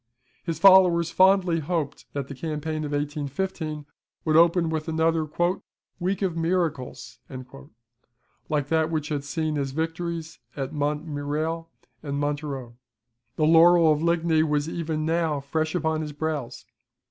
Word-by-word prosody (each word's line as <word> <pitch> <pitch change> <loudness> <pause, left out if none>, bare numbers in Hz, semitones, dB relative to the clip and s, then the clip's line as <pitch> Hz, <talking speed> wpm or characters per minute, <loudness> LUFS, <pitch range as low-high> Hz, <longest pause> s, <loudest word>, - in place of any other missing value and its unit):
His 165 -3 -3
followers 175 -2 +6
fondly 185 -3 +4
hoped 155 -2 -3
that 140 -2 -3
the 140 - -7
campaign 155 +2 -4
of 145 - -5
1815 150 +2 -3 0.4
would 155 -1 +2
open 170 0 +4
with 155 0 -3
another 160 -1 +1 0.7
"week 190 +2 -1
of 180 -4 0
miracles," 165 -5 -2 1.3
like 145 -2 -1
that 160 -1 +2
which 155 -2 -2
had 145 -2 -2
seen 155 +1 -2
his 135 -2 -2
victories 165 +1 -4 0.2
at 135 +1 -4
Montmirail 150 +2 -2 0.3
and 140 -2 -4
Montereau. 145 -5 -3 0.6
The 155 - +2
laurel 165 0 +6
of 150 0 +1
Ligny 170 -1 +2
was 150 -1 0
even 160 -2 -3
now 160 -2 0
fresh 155 +4 -2
upon 160 -2 0
his 150 -1 -5
brows. 145 -5 -4
160 Hz, 135 wpm, -25 LUFS, 145-165 Hz, 1.3 s, followers